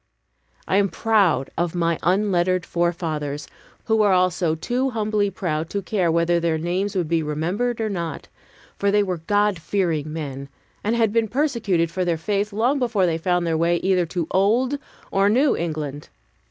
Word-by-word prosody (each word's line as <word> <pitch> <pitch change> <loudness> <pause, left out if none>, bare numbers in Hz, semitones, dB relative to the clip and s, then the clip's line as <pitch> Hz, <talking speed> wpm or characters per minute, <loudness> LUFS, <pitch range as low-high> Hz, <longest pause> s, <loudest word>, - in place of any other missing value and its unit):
I 190 - +2
am 200 -1 +3
proud 200 - +2
of 175 0 -1
my 170 -1 0
unlettered 185 -1 +1
forefathers, 160 -4 -2 0.4
who 220 -1 +2
were 210 -2 +4
also 180 -3 +2
too 250 +11 -1
humbly 215 -3 0
proud 165 -4 -3
to 200 -1 -3
care 185 -4 +1
whether 170 +1 +2
their 165 -1 0
names 180 +5 -2
would 180 -4 0
be 165 0 +1
remembered 175 +11 -2
or 220 - 0
not; 170 -7 -4 0.5
for 200 - +2
they 205 +1 +3
were 185 -3 -3
God 205 +2 +1
fearing 160 -5 -1
men, 140 -3 -6 0.3
and 220 +3 +1
had 225 -3 +2
been 230 -1 +2
persecuted 215 - 0
for 185 - -1
their 170 -2 0
faith 205 +5 -1
long 240 +7 +1
before 230 -7 +1
they 165 -2 0
found 180 +1 +1
their 165 -1 0
way 170 +1 +2
either 185 -2 +2
to 170 0 -2
Old 240 +9 +2 0.3
or 195 +1 +3
New 260 +7 +3
England. 150 -3 -4
180 Hz, 175 wpm, -22 LUFS, 165-210 Hz, 0.5 s, were